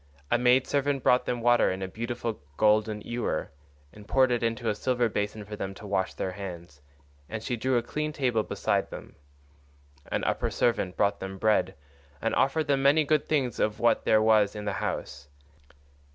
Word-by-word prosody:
A 120 - +3
maid 125 +1 +4
servant 140 -1 0
brought 125 0 +3
them 120 -1 -1
water 120 +1 +4
in 95 +1 -3
a - - -3
beautiful 115 +2 -4 0.2
golden 105 0 +2
ewer, 120 +3 -3 0.4
and 105 0 -14
poured 130 +1 +3
it 120 - +1
into 115 0 -1
a 110 - +2
silver 125 +2 0
basin 105 0 -3
for 105 +1 -7
them 95 -1 -5
to 105 - -11
wash 100 -2 -1
their 95 - -3
hands, 90 -6 -8 0.5
and 110 -1 -5
she 125 - -2
drew 130 +2 +1
a 120 - 0
clean 150 +5 -3
table 125 -7 0
beside - - -1
them; - - -10 1.0
an - - -1
upper - - 0
servant 100 -6 0
brought 100 -1 +1
them 95 0 -6
bread 110 +2 +1 0.4
and 115 - -1
offered 150 +4 +2
them 140 -2 +1
many 145 +3 +5
good 150 0 +1
things 135 -7 0
of 105 0 0
what 120 - +3
there 110 0 +4
was 110 -2 +4
in 105 0 -6
the 100 - -1
house. 70 0 -4
115 Hz, 190 wpm, -27 LUFS, 105-125 Hz, 1.0 s, many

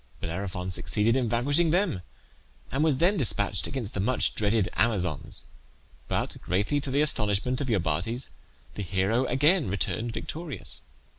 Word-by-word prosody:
Bellerophon 90 +1 -3
succeeded 110 +5 +1
in 125 -3 +1
vanquishing 145 +8 +2
them, 175 - +1 0.7
and 135 +5 +1
was 155 -4 +3
then 185 +7 +3
despatched 100 - +1
against 125 -7 -4
the - - -3
much 125 +7 +2
dreaded 105 -1 +2
Amazons; 90 - 0 0.6
but - - -1
greatly 100 - 0
to 140 - -3
the 140 +2 +2
astonishment 115 -1 +1
of 140 - -2
Iobates 100 - -1 0.4
the - - -5
hero 100 +6 +1
again 145 - +3
returned 110 +4 -1
victorious. 150 - -5
115 Hz, 140 wpm, -27 LUFS, 95-140 Hz, 0.7 s, was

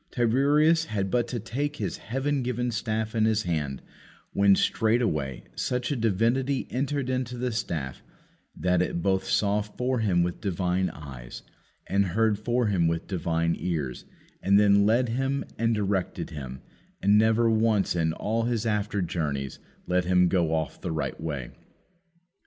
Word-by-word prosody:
Tiresias 145 +7 +3
had 100 -8 -2
but 120 -1 +1
to 120 - -3
take 140 +7 -3
his - - -3
heaven 135 +5 -1
given 125 0 -1
staff 110 0 -2
in 110 -2 +2
his 110 -1 +2
hand, 75 -6 -2 0.5
when, 100 0 +5
straightway, 100 - 0
such 125 +2 -1
a - - +1
divinity 120 +5 +1
entered 140 +1 -1
into 125 -1 -2
the 125 0 -1
staff 75 - -3 0.5
that 90 -1 +1
it 85 -2 -2
both 95 -1 +1
saw 105 0 +2
for 125 +5 -2
him 95 -6 +2
with 85 0 -3
divine 90 -1 0
eyes, 65 -7 -9 0.4
and 100 +1 +2
heard 110 -2 +3
for 120 +3 +1
him 95 -6 +2
with 85 0 -1
divine 85 -3 0
ears, 75 -8 -3 0.4
and 100 +1 +4
then 100 0 +5
led 120 +3 +3
him 135 +3 -1
and 115 0 +2
directed 100 -3 -2
him, 65 -4 -7 0.4
and 100 +2 +4
never 110 +1 +3
once 110 -4 +2
in 80 -2 +1
all 115 +7 -1
his 115 -2 -1
after 105 -2 0
journeys 75 -6 -3 0.3
let 90 0 +1
him 90 0 +4
go 85 -4 +1
off 80 -1 -2
the 90 - -3
right 80 0 -3
way. 70 -6 -4
105 Hz, 160 wpm, -27 LUFS, 85-120 Hz, 0.5 s, when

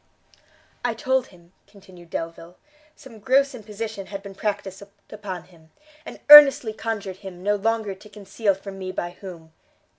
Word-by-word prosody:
"I 240 -2 -1
told 260 +2 0
him," 175 -1 -21
continued 185 -4 -17
Delvile, 165 +2 -7 0.4
"some 260 -7 -15
gross 270 +5 +2
imposition 215 -3 -7
had 200 -1 -8
been 200 -1 -10
practiced 195 -1 -4 0.3
upon 195 -5 -7
him, 165 -3 -22 0.4
and - - -10
earnestly 275 -6 +9
conjured 205 -4 -5
him 190 -2 -11
no 205 +1 +1
longer 220 0 -1
to 200 +3 -16
conceal 205 0 -2
from 195 0 -10
me 185 -1 -5
by 175 -1 -4
whom. 175 -4 -12
200 Hz, 150 wpm, -23 LUFS, 185-220 Hz, 0.4 s, earnestly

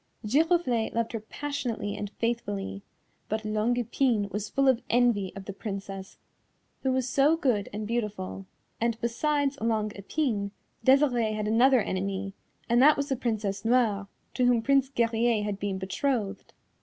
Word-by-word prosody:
Giroflée 275 -2 +2
loved 230 0 -1
her 225 - -3
passionately 230 -3 -4
and 205 - -4
faithfully, 205 -4 -2 0.5
but 220 0 -2
Longue 215 +3 +1
Epine 235 -3 +1
was 210 +1 -3
full 275 -1 +2
of 260 -3 +4
envy 235 -6 +2
of 195 -1 -8
the 200 - -6
Princess 195 -2 -6 0.6
who 265 - +1
was 260 -1 0
so 285 +5 +3
good 240 -10 0
and 210 +1 -4
beautiful, 210 -4 -3 0.3
and, 230 0 0
besides 280 +4 0
Longue 215 -2 0
Epine, 205 -1 -1 0.3
Desirée 255 -5 +4
had 210 0 -2
another 245 +3 +5
enemy, 195 0 -3 0.3
and 240 +1 +4
that 300 +3 +7
was 280 0 -2
the 270 - +1
Princess 220 -5 -2
Noire, 225 -4 +2 0.3
to 250 - +1
whom 240 -2 +3
Prince 275 +1 +3
Guerrier 230 -3 +1
had 205 -1 -3
been 200 -2 -2
betrothed. 200 +2 -2
230 Hz, 155 wpm, -28 LUFS, 205-255 Hz, 0.6 s, that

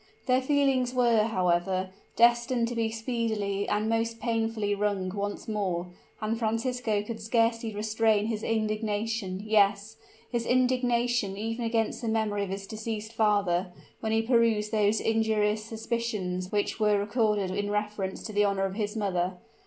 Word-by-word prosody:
Their 255 -1 +3
feelings 265 -2 +2
were, 235 -4 +4
however, 185 -2 0 0.2
destined 235 0 +3
to 245 - -4
be 225 -1 0
speedily 220 -3 -2
and 210 +1 0
most 230 0 0
painfully 225 -2 0
wrung 200 -2 -1
once 205 +3 -4
more; 185 -5 -2 0.3
and 220 +1 -2
Francisco 225 -1 0
could 225 +1 -6
scarcely 230 0 +1
restrain 215 0 +2
his 220 -1 -2
indignation 215 -2 -1
yes, 210 0 +2 0.3
his 235 -2 -1
indignation 245 -4 +1
even 225 +3 -3
against 225 -1 0
the 235 - -3
memory 215 -2 0
of 200 - -4
his 195 +1 -4
deceased 220 +1 -5
father 200 -5 +1 0.3
when 220 - -2
he 225 0 +2
perused 225 -3 +2
those 215 -1 +2
injurious 220 -1 +1
suspicions 220 -5 -3
which 205 +1 -1
were 210 -1 +3
recorded 210 -2 +1
in 205 +2 -2
reference 210 -2 -2
to 215 - -6
the 205 0 +3
honor 195 -1 +1
of 190 - -3
his 210 +1 -3
mother. 185 -3 -1
215 Hz, 150 wpm, -28 LUFS, 205-230 Hz, 0.3 s, were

